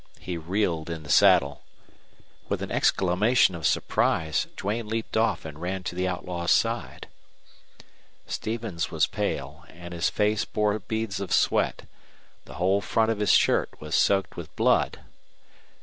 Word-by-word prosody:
He 90 - -5
reeled 85 -1 -1
in 80 -2 -5
the 70 - -12
saddle. 70 0 +4 0.9
With - - -2
an - - -6
exclamation 95 +4 +3
of 85 -4 -1
surprise 80 -2 0
Duane 105 +3 -3
leaped 110 +1 -4
off 110 -4 +1
and 75 0 -9
ran 90 +1 -3
to 90 - -4
the 90 +1 -1
outlaw's 90 -2 -3
side. - - 0 1.2
Stevens 110 -7 -3
was - - +2
pale, 75 +5 -4
and 85 +1 -10
his 85 -1 0
face 105 0 +1
bore 105 0 0
beads 110 -1 -3
of 100 - -5
sweat. - - +1 0.6
The - - -11
whole 95 +3 +1
front 110 +1 +1
of 110 - -3
his 105 -2 +3
shirt - - +2
was - - -7
soaked 95 -2 +2
with 85 -3 -9
blood. - - +2
95 Hz, 150 wpm, -26 LUFS, 85-105 Hz, 1.2 s, saddle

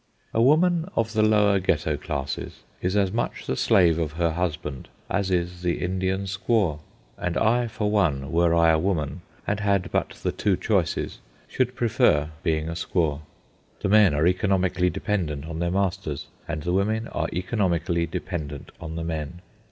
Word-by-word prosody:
A 115 - +2
woman 165 +6 +4
of 115 0 0
the 110 - +2
lower 105 -2 +4
Ghetto 80 -4 0
classes 70 -2 -5 0.2
is 90 +2 0
as 100 -2 +2
much 120 +3 -2
the - - -1
slave 85 +2 +4
of 80 -2 -2
her 85 0 +1
husband 80 -5 -3 0.2
as 100 -1 0
is 90 -1 -1
the 90 -1 0
Indian 95 +1 -1
squaw. 95 -4 0 0.4
And 90 -1 -1
I, 120 +2 +2
for 105 -2 -2
one, 75 -10 +1
were 85 0 +3
I 85 -1 +5
a 80 - +3
woman 80 -4 -1 0.2
and 105 0 -1
had 100 -2 +1
but - - 0
the - - +1
two 100 -4 +1
choices, 95 -7 0 0.3
should 125 0 -1
prefer 115 - +2
being 80 -1 0
a - - -3
squaw. 85 -3 -1 0.6
The 100 - 0
men 105 -6 +6
are 75 +2 +2
economically 90 -1 +2
dependent 80 -9 -2
on 80 0 -5
their 85 0 0
masters, 90 -6 -1 0.2
and 80 -3 -4
the 90 - -1
women 110 +4 +1
are - - -2
economically 90 -3 0
dependent 80 -4 -5
on 80 -1 -6
the 85 - -3
men. 80 +1 -4
90 Hz, 170 wpm, -25 LUFS, 80-100 Hz, 0.6 s, men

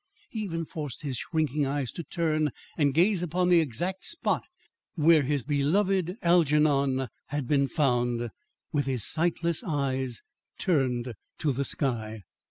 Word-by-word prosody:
He 225 - -4
even 165 -6 -3
forced 150 -3 -6
his 135 -4 -2
shrinking 150 -2 0
eyes 140 -2 -2
to 170 - -6
turn 155 -3 0 0.3
and 145 -3 +2
gaze 180 +5 +3
upon 180 +1 0
the 175 -1 +6
exact 170 +6 -2
spot 335 - +1 0.5
where 160 -1 +5
his 140 -1 0
beloved 180 - +1
Algernon 150 -6 +3 0.2
had 145 -3 -3
been 140 -1 +2
found, 120 -3 0 0.4
with 145 -3 0
his 130 -5 +1
sightless 170 +2 +1
eyes 135 - -2 0.4
turned 130 -8 0 0.2
to 150 - 0
the 135 +2 -1
sky. 110 -8 -2
150 Hz, 140 wpm, -28 LUFS, 135-170 Hz, 0.5 s, the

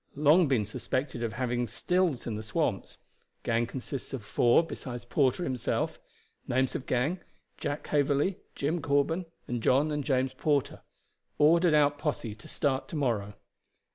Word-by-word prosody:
Long 150 +4 +5
been 125 -6 +2
suspected 125 +4 -3
of 115 -2 -2
having 120 0 -1
stills 170 - 0
in 115 - -3
the 105 - -4
swamps. 110 -2 -2 0.5
Gang 115 +1 +1
consists 135 +1 -6
of 130 -5 -4
four 120 +9 +4
besides 120 -7 -7
Porter 135 +6 +1
himself. 130 -6 -1 0.5
Names 130 +1 +1
of 130 - -5
gang, 135 +9 +1 0.4
Jack 145 -1 -3
Haverley, 145 +5 +1 0.2
Jim 155 +4 -1
Corben, 145 +5 +1 0.2
and 120 -1 -2
John 140 +7 +3
and 150 -1 -1
James 130 -1 +1
Porter. 145 -3 0 0.6
Ordered 165 +2 +5
out 145 -1 +3
posse 145 -8 -2
to 110 - -14
start 135 -2 -1
to - - -7
morrow. 110 -8 -1
135 Hz, 150 wpm, -29 LUFS, 120-150 Hz, 0.6 s, Long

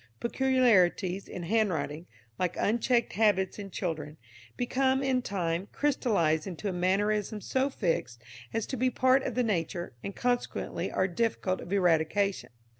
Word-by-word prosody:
Peculiarities 220 -8 +2
in 180 - -6
handwriting, 170 -6 0 0.3
like 180 -1 -1
unchecked 235 +2 +1
habits 200 -2 +2
in 200 -1 -6
children, 160 -5 -4 0.4
become, 265 +2 +1
in 260 -2 +1
time, 180 -4 -2
crystallised 200 - +1
into 190 +2 -5
a 190 - -1
mannerism 205 +4 0
so 260 +6 0
fixed 165 - -2 0.3
as 225 - -1
to - - -4
be 255 +2 +2
part 260 +1 +3
of - - -4
the 250 - +2
nature, 175 -5 -2
and 200 - -5
consequently 245 0 -2
are 190 - +1
difficult 190 -1 -1
of 175 - -9
eradication. 190 +1 +1
200 Hz, 140 wpm, -29 LUFS, 175-245 Hz, 0.4 s, part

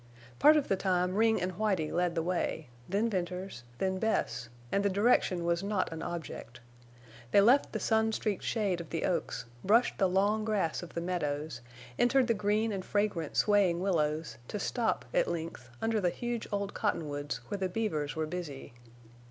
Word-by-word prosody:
Part 305 +1 +7
of 290 - 0
the 195 - +2
time 185 -1 +1
Ring 220 +1 +3
and 180 +1 -1
Whitie 185 -5 0
led 175 -1 0
the 165 - 0
way, 170 -4 -2 0.2
then 205 +5 +1
Venters, 180 - -3
then 190 +3 -1
Bess; 120 - -1 0.2
and 200 - +2
the 200 - +3
direction 195 -4 +2
was 170 0 +1
not 200 -4 -1
an 160 - -6
object. 165 -8 -6 0.7
They 200 - +5
left 245 +8 +5
the - - -2
sun 220 0 +2
streaked 215 -2 -1
shade 200 -6 0
of 165 - -10
the 165 - -2
oaks, 175 -8 -1 0.2
brushed 230 +5 +3
the 190 -2 +4
long 205 +4 +2
grass 205 -7 0
of 175 - -10
the 170 - -1
meadows, 150 -6 -2 0.4
entered 255 +2 +4
the 230 - +2
green 215 +1 +1
and 195 -2 -3
fragrant 200 -8 -1
swaying 200 -5 +4
willows, 155 - 0
to - - -4
stop, 225 +2 -1
at - - +3
length, 165 -7 -5
under 225 -1 +1
the 180 - +3
huge 240 +4 -4
old 200 -1 -2
cottonwoods 145 -8 -2
where 205 - -3
the 190 -1 0
beavers 175 -8 -2
were 160 0 -1
busy. 155 -7 -6
185 Hz, 180 wpm, -31 LUFS, 165-215 Hz, 0.7 s, Part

